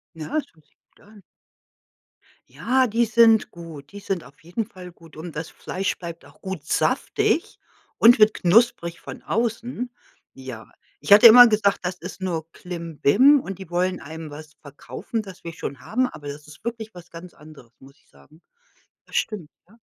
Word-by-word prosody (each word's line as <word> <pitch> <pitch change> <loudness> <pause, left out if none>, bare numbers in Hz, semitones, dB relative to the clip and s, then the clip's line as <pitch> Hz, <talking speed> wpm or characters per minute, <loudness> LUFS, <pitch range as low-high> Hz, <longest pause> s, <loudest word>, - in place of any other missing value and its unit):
Ja, 160 -1 -7
das - - -4
hört 155 -2 -26
sich - - -39 0.2
gut - - -25
an. 205 -1 -18 1.3
Ja, 255 +2 +1
die 230 +2 +1
sind 225 0 +4
gut. 165 -5 -11
Die 205 - -9
sind 195 -3 -3
auf 140 +3 -18
jeden 180 +7 -4
Fall 185 -5 -12
gut 165 -2 -18
und 160 +1 -9
das 165 +1 -5
Fleisch 190 +1 -4
bleibt 170 -1 -9
auch - - -20
gut 190 -6 -6
saftig 420 - 0 0.4
und 230 0 +6
wird 215 0 +6
knusprig 190 -2 +2
von - - -10
außen. 235 +2 -3 0.4
Ja, 130 -4 -10 0.3
ich - - +4
hatte 210 +3 +10
immer 245 +2 +10
gesagt, 210 -2 +1
das 180 0 -3
ist 185 +2 -10
nur 165 -3 -3
Klimbim 175 - +2
und 195 -6 -7
die 190 -3 -10
wollen 180 +1 -1
einem 160 +2 -8
was 155 +1 -11
verkaufen, 150 - -6
das 195 -3 -13
wir 170 - -7
schon 135 -4 -7
haben, 255 - 0
aber 145 -11 -11
das 145 +1 -8
ist 150 - -15
wirklich 225 -2 -6
was 175 -1 -13
ganz 170 +1 -11
anderes, 150 -6 -16
muss 135 +1 -17
ich - - -33
sagen. 70 - -22 0.6
Das - - -13
stimmt, 190 -9 -2 0.2
ja. 220 +5 -22
180 Hz, 180 wpm, -23 LUFS, 155-220 Hz, 1.3 s, hatte